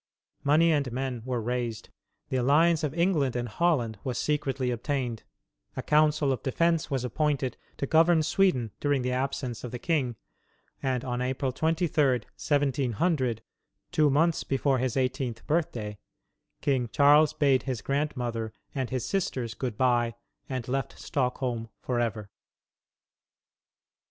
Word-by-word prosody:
Money 160 +4 +4
and 140 -5 +1
men 130 -1 -3
were 125 -2 -1
raised, 120 -1 -3 0.4
the - - -2
alliance 155 +6 +4
of 150 - 0
England 170 -8 +2
and 120 0 -1
Holland 120 - +1
was 125 -3 -3
secretly 135 -4 0
obtained, 120 -2 -2 0.6
a - - -2
council 150 -1 +3
of 130 - -2
defence 165 +4 +1
was 135 -3 -1
appointed 135 0 0 0.2
to - - -1
govern 160 +2 +4
Sweden 150 - +2
during 145 -3 +1
the 125 - -1
absence 130 -2 -2
of 125 - -4
the 125 - -5
king, 130 -4 0 0.7
and 130 -1 -1
on 125 -1 -2
April 130 +1 -1
23, 160 -2 +2
1700, 130 - 0 0.5
two 150 -1 +4
months 160 +4 +2
before 135 -1 +1
his 130 0 -1
eighteenth 130 -3 -1
birthday, 120 -10 -1 0.6
King 130 -4 +1
Charles 150 +1 +5
bade 140 -4 +3
his 125 -4 -3
grandmother 125 -6 -2 0.2
and 130 -3 -2
his 130 -2 -2
sisters 130 - -2
good 125 -5 -4
by 120 -2 +2 0.3
and 130 -3 -3
left 135 -1 -2
Stockholm 125 -3 -2
forever. 115 -4 -2
130 Hz, 135 wpm, -28 LUFS, 120-150 Hz, 0.7 s, Charles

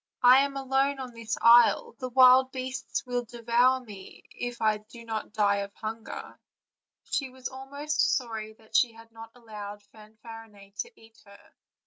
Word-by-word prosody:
"I 250 +2 +8
am 275 0 0
alone 270 +1 0
on 255 -2 -7
this 230 -1 -4
isle; 240 - +6
the 255 -2 -4
wild 255 +1 +6
beasts 260 +1 -4
will 245 -1 -2
devour 240 +2 +1
me 205 -6 -12
if 245 0 -6
I 215 -1 +1
do 230 +2 -14
not 220 -2 -5
die 205 -1 +2
of 200 0 -5
hunger:" 220 +1 -7 0.6
she 270 -2 -2
was 255 0 -7
almost 280 +4 -1
sorry 220 -4 -6
that 220 0 -17
she 240 -3 +4
had 225 0 -16
not 225 0 -11
allowed 210 -3 -9
Fanfarinet 215 -2 -14
to 470 -2 -6
eat 225 0 -20
her. 200 0 -18
235 Hz, 160 wpm, -27 LUFS, 220-260 Hz, 0.6 s, I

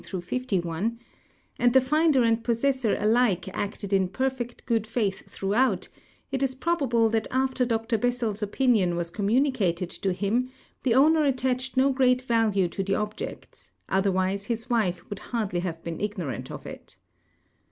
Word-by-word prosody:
51 190 0 -2
j 235 - -29 0.6
and 245 -1 +4
the 265 - +8
finder 295 0 +3
and 230 0 +2
possessor 240 0 +1
alike 215 -4 +2
acted 200 +1 -4
in 190 -2 +3
]»erfect 255 +2 -3
good 225 -3 0
faith 215 -4 -2
throughout, 215 +7 0 0.4
it 265 - -1
is 265 -1 0
probable 265 -7 +1
that 220 0 0
after 260 -1 +1
Dr 225 -1 0
Bes 245 +2 +1
sels' 220 -3 -2
opinion 210 -4 +2
was 170 -1 -3
communicated 205 -5 +1
to 195 - -2
him. 215 +7 0 0.3
the 235 -3 +2
owner 310 +4 +5
attached 260 -1 0
no 270 +1 +4
great 255 -1 +3
value 225 -6 +2
to 195 - -4
the 195 0 -1
oljects, 210 +1 -5 0.2
otherwise 190 0 +1
his 230 +2 -4
wife 185 -7 0
could 205 -1 -6
hardly 215 -7 -2
have 170 -2 -4
been 165 -1 -5
ignoi 190 - -3
ant - - -7
of - - -8
it. - - -10
225 Hz, 160 wpm, -26 LUFS, 195-255 Hz, 0.6 s, the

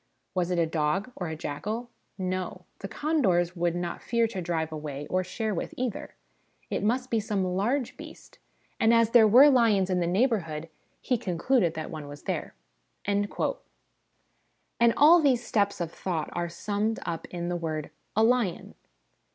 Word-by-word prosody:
Was 180 -2 0
it 180 - 0
a 170 - +3
dog, 160 +8 -1
or 180 - -4
a 160 - -4
jackal? 215 +11 -4 0.3
No; 185 -1 -3
the 195 - -5
condors 195 - +1
would 170 -1 0
not 175 -1 -4
fear 235 -1 +1
to 195 -5 -4
drive 165 -2 -2
away, 150 -2 -5
or 185 0 +1
share 215 +4 -3
with, - - -4
either: 250 -4 -4 0.6
it - - -1
must 250 +4 0
be 225 - +2
some 205 -3 -1
large 240 +6 -1
beast, - - -12 0.4
and 225 +1 +5
as 230 -1 +3
there 230 -2 +7
were 250 +7 +8
lions 220 -8 +4
in 180 - +2
the 170 - 0
neighbourhood, 175 - 0 0.3
he 250 -3 0
concluded 180 0 +1
that 155 +1 -5
one 155 -3 -7
was 145 0 -10
here." - - -3 0.5
And 205 0 +1 1.7
all 325 +4 +7
these 255 -5 +2
steps 200 -2 +1
of 170 -2 -3
thought 165 -4 -3
are 175 0 -2
summed 205 +5 -2
up 170 -2 -4
in 175 -1 -4
the 175 - -1
words 160 -3 -3 0.2
' - - -45
A 220 - +4
lion.' 230 -6 +1
190 Hz, 170 wpm, -27 LUFS, 170-230 Hz, 1.7 s, were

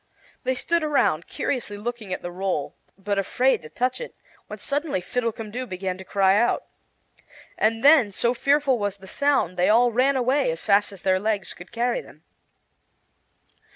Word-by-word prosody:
They 260 0 +1
stood 335 +6 0
around, 280 - +1
curiously 245 -7 -3
looking 220 -2 -5
at 185 - -4
the 175 - -5
roll, 180 -5 -3 0.2
but 200 0 -1
afraid 250 +7 +1
to 155 - -11
touch 255 - -1
it, 485 - -8 0.3
when - - -7
suddenly 290 - -2
Fiddlecumdoo 230 +4 -3
began 185 -1 -3
to - - -8
cry 195 +1 +3
out. 235 +2 +1 0.9
And 225 +2 +1
then, 285 -8 +6
so 235 +5 +1
fearful 275 0 +2
was 205 -1 -2
the 190 - -14
sound, 270 - 0
they 180 - +3
all 240 +3 +5
ran 260 +4 +2
away 260 +2 +2
as 165 0 -4
fast 205 0 +3
as 195 -2 -12
their 185 -1 +2
legs 210 0 -2
could 175 - -13
carry 245 - 0
them. - - -17
225 Hz, 170 wpm, -24 LUFS, 190-255 Hz, 0.9 s, then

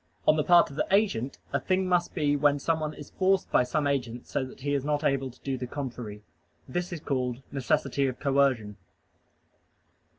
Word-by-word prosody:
On 155 - +7
the 155 - +1
part 175 -2 +5
of 140 - -10
the - - 0
agent, 190 - +1 0.2
a 140 - +2
thing 185 +5 0
must 175 -1 +1
be, 145 -4 +2
when 145 0 +3
someone 155 +1 -1
is 145 - -11
forced 190 0 +1
by - - +5
some 135 +4 0
agent, 125 -4 -1
so - - -2
that 130 0 -10
he 145 +1 -1
is 140 -2 0
not 150 +1 0
able 135 -2 +1
to 125 - -17
do 135 -2 -3
the 125 - -4
contrary. 120 -6 -6 0.4
This 175 +7 -3
is 170 - -4
called 130 -4 -2
"necessity 140 0 0
of 130 -1 -4
coercion." 135 -7 +1
140 Hz, 195 wpm, -28 LUFS, 130-155 Hz, 0.4 s, On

